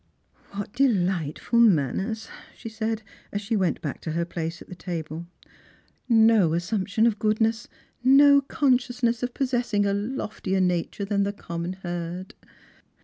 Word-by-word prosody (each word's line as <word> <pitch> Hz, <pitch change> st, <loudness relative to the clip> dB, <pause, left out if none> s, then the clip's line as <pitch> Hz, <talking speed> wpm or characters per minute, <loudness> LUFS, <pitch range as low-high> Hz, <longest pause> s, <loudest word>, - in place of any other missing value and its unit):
" -, -, -32 dB
What 205 Hz, 0 st, -5 dB
delightful 190 Hz, -, +1 dB
manners 215 Hz, -, +2 dB
!" -, -, -20 dB
she 230 Hz, -, -7 dB
said, 220 Hz, 0 st, -3 dB, 0.3 s
as 205 Hz, -, -2 dB
she 215 Hz, +3 st, -2 dB
went 185 Hz, -4 st, 0 dB
back 145 Hz, -, -4 dB
to 160 Hz, -, -4 dB
her 170 Hz, +1 st, 0 dB
place 170 Hz, 0 st, -4 dB
at -, -, -13 dB
the -, -, -9 dB
table; 170 Hz, -2 st, -6 dB, 0.5 s
" -, -, -37 dB
no 220 Hz, -7 st, +5 dB
assumption 200 Hz, +4 st, 0 dB
of 220 Hz, -3 st, +1 dB
goodness, 220 Hz, +1 st, +1 dB, 0.4 s
no 280 Hz, +2 st, +7 dB
con 270 Hz, -2 st, +2 dB
sciousness 240 Hz, -2 st, -2 dB
of 245 Hz, -1 st, -3 dB
possessing 245 Hz, -6 st, 0 dB
a 200 Hz, -, +1 dB
loftier 205 Hz, -3 st, -2 dB
nature 180 Hz, +2 st, 0 dB
than 200 Hz, 0 st, 0 dB
the 200 Hz, 0 st, 0 dB
common 170 Hz, -2 st, -5 dB
herd." 175 Hz, +1 st, -5 dB
205 Hz, 155 wpm, -25 LUFS, 175-230 Hz, 0.5 s, no